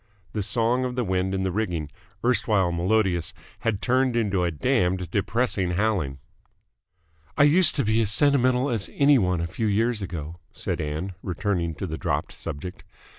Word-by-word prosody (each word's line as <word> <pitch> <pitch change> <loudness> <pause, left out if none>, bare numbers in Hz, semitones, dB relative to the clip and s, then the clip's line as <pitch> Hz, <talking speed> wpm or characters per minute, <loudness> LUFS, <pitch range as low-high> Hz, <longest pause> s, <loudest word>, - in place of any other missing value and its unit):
The 105 - -1
song 120 +5 +1
of 125 -1 -3
the 125 - 0
wind 95 -1 -1
in 95 - -1
the 95 - -1
rigging, 90 -7 -2 0.3
erstwhile 105 -6 +2
melodious, 90 -1 0 0.2
had 110 -3 -2
turned 130 0 +2
into 100 -6 +1
a 85 - +1
damned 90 - 0
depressing 100 -3 0
howling. 90 -9 0 1.2
"I 145 - +6
used 160 +5 +6
to 140 - 0
be 110 +2 +2
as 110 - +1
sentimental 130 +1 +2
as 110 -5 -1
any 140 -2 +5
one 90 -4 0
a - - -1
few 110 +7 -3
years 110 +2 +1
ago," 85 -3 -6 0.2
said - - -3
Ann, 80 +5 -4
returning 90 -3 -2
to 95 - -5
the 80 -3 -5
dropped - - -2
subject. 90 +6 -7
100 Hz, 170 wpm, -25 LUFS, 90-120 Hz, 1.2 s, I